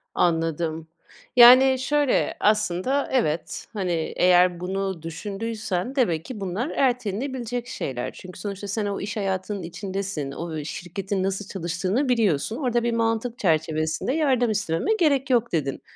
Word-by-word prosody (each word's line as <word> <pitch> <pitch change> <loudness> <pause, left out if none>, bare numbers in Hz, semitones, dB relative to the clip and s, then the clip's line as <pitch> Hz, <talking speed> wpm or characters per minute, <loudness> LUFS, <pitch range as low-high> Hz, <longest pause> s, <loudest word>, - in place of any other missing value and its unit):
Anladım. 165 -1 0 0.5
Yani, 255 +2 +8
şöyle, 290 0 +1
aslında, 210 +6 +1
evet, 170 -11 -1
hani, 190 -4 -2 0.3
eğer 180 -1 +4
bunu 190 -1 -3
düşündüysen 205 - -4
demek 170 - +1
ki 245 -5 -7
bunlar 195 - -2
ertelenebilecek 245 -1 -1
şeyler. 125 - -4
Çünkü 185 0 -11
sonuçta 200 +1 -5
sen 210 +2 -2
o 200 -1 -3
iş 210 +2 -4
hayatının 195 0 -2
içindesin, 185 -4 -4
o, 170 +4 -6
ı 155 -2 -4
şirketin 185 +4 -4
nasıl 195 +1 -2
çalıştığını 185 - -1
biliyorsun, 220 - +1
orada 240 -4 0
bir 235 0 0
mantık 230 +1 -1
çerçevesinde 160 +4 0
yardım 260 -7 +2
istememe 210 - 0
gerek 280 -5 +2
yok, 240 -2 +2
dedin. 140 -5 -1
200 Hz, 135 wpm, -24 LUFS, 175-240 Hz, 0.5 s, Yani